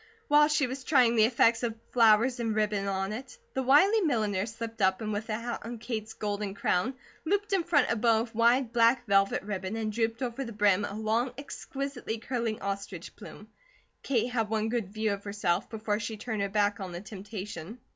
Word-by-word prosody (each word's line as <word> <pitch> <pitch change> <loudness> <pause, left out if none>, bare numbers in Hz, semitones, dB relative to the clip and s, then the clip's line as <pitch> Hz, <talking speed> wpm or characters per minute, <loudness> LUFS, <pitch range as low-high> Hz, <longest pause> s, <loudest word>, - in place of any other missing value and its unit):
While 295 0 +6
she 300 -2 +2
was 260 +1 -5
trying 250 -5 +4
the 215 -1 +6
effect 230 -1 +3
of 235 -2 -2 0.2
flowers 235 +2 +4
and 225 -2 -1
ribbon 210 -2 0
on 195 +1 -1
it, 265 - -8 0.2
the 265 - -1
wily 340 - +5
milliner 215 - 0
slipped 225 0 -7
up 190 0 +3
and 215 -1 -3
with 210 +2 -3
the 215 - -1
hat 235 +1 -4
on 235 +1 -6
Kate's 220 -2 -5
golden 205 -1 -3
crown, 200 +6 0 0.3
looped 405 +5 0
in 380 -3 +2
front 320 -6 +2
a - - +2
bow 225 0 +3
of 230 0 -6
wide 235 +2 +3
black 235 +1 +4
velvet 195 -2 +2
ribbon 195 0 -4
and 220 -1 -2
drooped 230 +2 -1
over 250 +2 -3
the 235 -3 -7
brim 205 -1 +3
a 200 - -6
long, 220 +3 0
exquisitely 275 -4 -5
curling 230 -2 -3
ostrich 200 0 -5
plume. - - -12 0.5
Kate 245 -2 0
had 225 -3 0
one 220 0 0
good 225 -5 -2
view 215 0 0
of 200 0 -6
herself, 200 -3 -1
before 215 -1 -2
she 220 0 -4
turned 220 -1 -3
her 200 - 0
back 205 0 +1
on 185 -3 -6
the 175 - -6
temptation. 200 -1 -7
225 Hz, 205 wpm, -29 LUFS, 205-245 Hz, 0.5 s, While